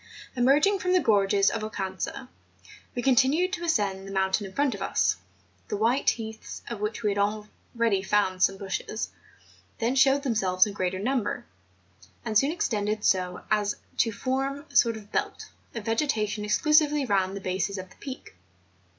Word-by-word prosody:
Emerging 290 +11 +4
from 365 0 0
the 370 - +5
gorges 200 - +3
of 225 - -3
Oucanca, 195 +3 -4 0.7
we 245 - -2
con¬ 265 - +4
tinued 310 - +3
to 345 -4 -4
ascend 200 - 0
the - - -7
mountain 190 +1 0
in - - -11
front 280 +1 +1
of - - -8
us; - - +1 0.5
the - - -2
white 235 +6 +2
heaths, 220 -1 -5
of 235 -3 -5
which 210 +3 -3
we 210 - +2
had 200 - -2
already 210 +1 -1
found 190 -2 +1
some 195 +1 +3
bushes, 200 +2 -4 0.7
then 235 +1 0
showed 270 +1 +4
themselves 190 -8 +3
in 205 - -5
greater 185 -1 -1
number, 240 +2 -1 0.8
and 220 -2 -3
soon 275 +7 +4
extended 215 -9 -1
so 180 -1 +1
as 205 -1 +2 0.2
to 225 - +2
form 270 +5 -2
a - - -18
sort 230 -2 +4
of 210 -1 -13
belt - - -3 0.2
of 225 -3 -5
vegetation 225 -4 0
exclusively 295 +6 +3
round 195 -3 +1
the - - -4
bases 190 +1 -2
of 185 0 -8
the - - -17
peak. 265 - -8
215 Hz, 170 wpm, -27 LUFS, 200-265 Hz, 0.8 s, the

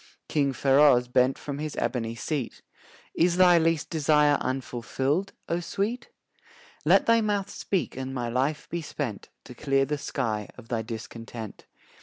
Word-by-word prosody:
King 140 -3 +1
Feroz 135 -2 +4
bent 125 +1 +2
from 145 -1 -6
his 155 -1 -4
ebony 115 -3 -2
seat: 135 +1 -4 0.5
"Is 175 +1 +2
thy 180 -2 +7
least 165 -2 0
desire 150 -2 +3
unfulfilled, 135 +6 -2 0.2
O 170 - 0
Sweet? 210 +7 -3 0.7
"Let - - +5
thy 230 0 +4
mouth 205 -2 -1
speak 190 -3 -2
and 130 0 -4
my 125 -3 -3
life 135 +6 -1
be 170 +1 -3
spent 140 -8 -5
To - - -11
clear 135 +1 +1
the 150 +1 -2
sky 110 -8 -2
of 115 - -13
thy 115 -2 -1
discontent." 115 0 -8
140 Hz, 150 wpm, -27 LUFS, 125-165 Hz, 0.7 s, thy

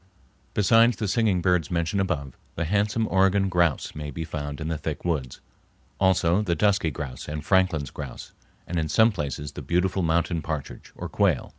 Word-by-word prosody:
Besides 115 +3 +5
the 105 - -2
singing 100 -4 +1
birds 90 -5 +2
mentioned 85 +3 0
above, 70 -9 -2 0.2
the 85 - -1
handsome 105 +5 +1
Oregon 95 +1 +3
grouse 85 -5 +1
may 75 -1 -6
be 80 +3 -5
found 75 -2 -5
in 80 - -4
the 80 -1 -2
thick 80 -1 -5
woods, 70 -8 -2 0.6
also 95 -1 +3
the 90 -5 0
dusky 100 -5 +2
grouse 70 -4 -6
and 75 0 -5
Franklin's 95 -7 +2
grouse, - - -8 0.3
and 85 0 -2
in 80 -1 -2
some 110 +8 +5
places 75 - -4
the - - -8
beautiful 90 +2 0
mountain 85 0 +1
partridge, 75 -2 -6
or - - -5
quail. - - +1
85 Hz, 175 wpm, -25 LUFS, 75-95 Hz, 0.6 s, Besides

